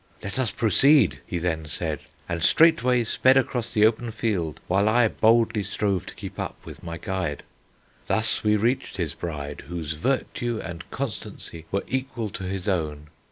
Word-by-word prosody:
'Let 100 +6 -3
us 130 -4 +1
proceed,' 110 - +4
he - - -2
then 80 -2 -2
said, 70 - -2 0.3
and 85 0 -3
straightway 125 - +5
sped 130 +4 +4
across 125 -3 0
the 110 -2 +4
open 115 +2 +1
field, 95 -9 -2
while 100 +3 +3
I 120 +1 +4
boldly 115 0 +3
strove 100 -1 -1
to - - -8
keep - - -8
up - - -3
with - - -10
my 85 0 -6
guide. 95 -3 -3 0.6
"Thus 110 0 +1
we 105 0 +4
reached 115 +4 0
his 80 -6 -1
bride, 75 -4 -6
whose 80 -2 -4
virtue 120 - -1
and 85 -4 -7
constancy 100 -9 -5
were 100 - 0
equal 130 -4 -3
to 95 - -6
his 95 +1 -4
own. 75 -5 -1
100 Hz, 165 wpm, -25 LUFS, 85-115 Hz, 0.6 s, straightway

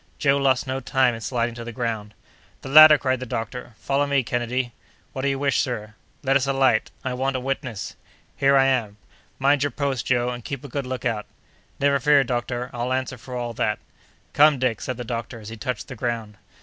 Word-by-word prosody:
Joe 140 -1 +3
lost 135 -2 +2
no 130 0 -2
time 130 -2 +2
in 115 - -7
sliding 120 0 -1
to 120 0 -7
the 120 - -6
ground. 110 -3 -4 0.5
"The - - -6
ladder!" 155 +1 +10
cried 130 -2 0
the 130 - -6
doctor. 120 0 -5
"Follow 140 +1 0
me, 140 -2 +2
Kennedy." 120 +1 -2 0.4
"What 130 - -4
do 140 - 0
you 135 -1 0
wish, 140 0 +1
sir?" 110 -4 -4 0.3
"Let 135 0 +2
us 140 -1 +2
alight. 135 -4 +2
I 130 - -2
want 135 +1 -1
a - - 0
witness." 130 -4 -4 0.4
"Here 140 0 +4
I 135 - +5
am!" 120 -6 0 0.4
"Mind 140 +1 +3
your 145 - +2
post, 140 -4 -2
Joe, 120 -1 +2
and 120 -1 -5
keep 140 +1 -5
a - - -7
good 140 0 -4
lookout." 120 -4 -2 0.5
"Never 140 0 +3
fear, 145 +1 +5
doctor; 120 0 -3
I'll 120 +1 -2
answer 130 -1 -2
for 125 +2 -8
all 120 -1 -3
that." - - 0 0.6
"Come, 150 0 +6
Dick," 125 -4 0
said 130 - -4
the 125 - -4
doctor, 115 0 -5
as 105 -1 -9
he 115 - -7
touched 115 +1 -4
the 130 - -8
ground. 115 -3 -3
130 Hz, 215 wpm, -24 LUFS, 120-135 Hz, 0.6 s, ladder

